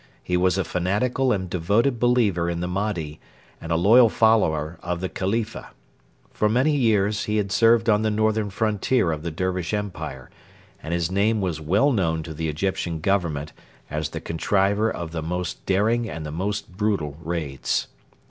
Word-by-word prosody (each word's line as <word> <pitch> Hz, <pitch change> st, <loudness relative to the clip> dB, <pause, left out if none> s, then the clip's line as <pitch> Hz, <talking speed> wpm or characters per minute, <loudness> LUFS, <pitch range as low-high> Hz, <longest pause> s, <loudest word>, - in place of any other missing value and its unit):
He 90 Hz, -, -1 dB
was 90 Hz, +1 st, +2 dB
a 95 Hz, -, +1 dB
fanatical 105 Hz, +10 st, 0 dB
and 95 Hz, -5 st, -1 dB
devoted 105 Hz, +9 st, +1 dB
believer 110 Hz, -9 st, +2 dB
in 85 Hz, 0 st, -2 dB
the 90 Hz, -, -2 dB
Mahdi 90 Hz, -5 st, -3 dB, 0.4 s
and 80 Hz, -, -6 dB
a -, -, +3 dB
loyal 110 Hz, +8 st, +6 dB
follower 90 Hz, -9 st, +2 dB
of 85 Hz, 0 st, -3 dB
the 95 Hz, 0 st, -3 dB
Khalifa. 110 Hz, +4 st, -3 dB, 0.6 s
For 105 Hz, -, +1 dB
many 130 Hz, +7 st, +2 dB
years 105 Hz, -5 st, +2 dB
he 105 Hz, 0 st, 0 dB
had 100 Hz, -2 st, -1 dB
served 115 Hz, +2 st, +4 dB
on 105 Hz, -1 st, +4 dB
the 110 Hz, -, +1 dB
northern 110 Hz, 0 st, +1 dB
frontier 105 Hz, -1 st, +1 dB
of 75 Hz, -1 st, -3 dB
the 85 Hz, -, -3 dB
Dervish 90 Hz, +3 st, -2 dB
Empire, 75 Hz, -10 st, -6 dB, 0.5 s
and 80 Hz, -, -6 dB
his 85 Hz, 0 st, 0 dB
name 105 Hz, +3 st, +2 dB
was 90 Hz, -5 st, -2 dB
well 100 Hz, -, +3 dB
known 80 Hz, -8 st, 0 dB
to 80 Hz, -, -7 dB
the 80 Hz, +1 st, -3 dB
Egyptian 85 Hz, +1 st, -2 dB
Government 80 Hz, -5 st, -1 dB, 0.4 s
as 75 Hz, 0 st, -2 dB
the -, -, -5 dB
contriver 100 Hz, +6 st, +1 dB
of 85 Hz, -2 st, -5 dB
the 80 Hz, -1 st, -3 dB
most 90 Hz, +3 st, -4 dB
daring 110 Hz, +5 st, +1 dB
and 80 Hz, 0 st, -6 dB
the 75 Hz, -, -5 dB
most 95 Hz, +2 st, -3 dB
brutal 100 Hz, -9 st, -1 dB
raids. 80 Hz, -5 st, -2 dB
95 Hz, 175 wpm, -24 LUFS, 80-110 Hz, 0.6 s, loyal